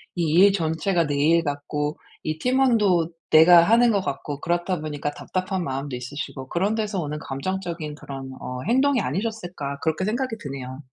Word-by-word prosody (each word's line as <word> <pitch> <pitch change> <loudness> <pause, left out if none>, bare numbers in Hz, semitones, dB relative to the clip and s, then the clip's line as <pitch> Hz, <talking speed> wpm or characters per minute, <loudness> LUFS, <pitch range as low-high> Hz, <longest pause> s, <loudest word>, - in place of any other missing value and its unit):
이 170 -3 0
일 200 +1 +8
전체가 165 -1 0
내 145 - -1
일 165 +4 +3
같고 145 0 -3 0.3
이 155 0 -2
팀원도 225 -10 +3 0.2
내가 170 +2 +8
하는 230 +5 +5
것 200 -2 +1
같고 145 -3 -4
그렇다 175 +1 -1
보니까 145 -1 -3
답답한 185 +3 -3
마음도 135 -2 -4
있으시고 130 +1 -6
'그런 195 +5 0
데서 210 -3 -2
오는 150 -1 -4
감정적인 165 +1 -4
그런 135 -2 -8
어 125 0 -5
행동이 265 +1 +3
아니셨을까.' 175 - -4
그렇게 160 +3 0
생각이 230 +2 -2
드네요. 135 -2 -6
165 Hz, 365 characters per minute, -24 LUFS, 145-195 Hz, 0.3 s, 일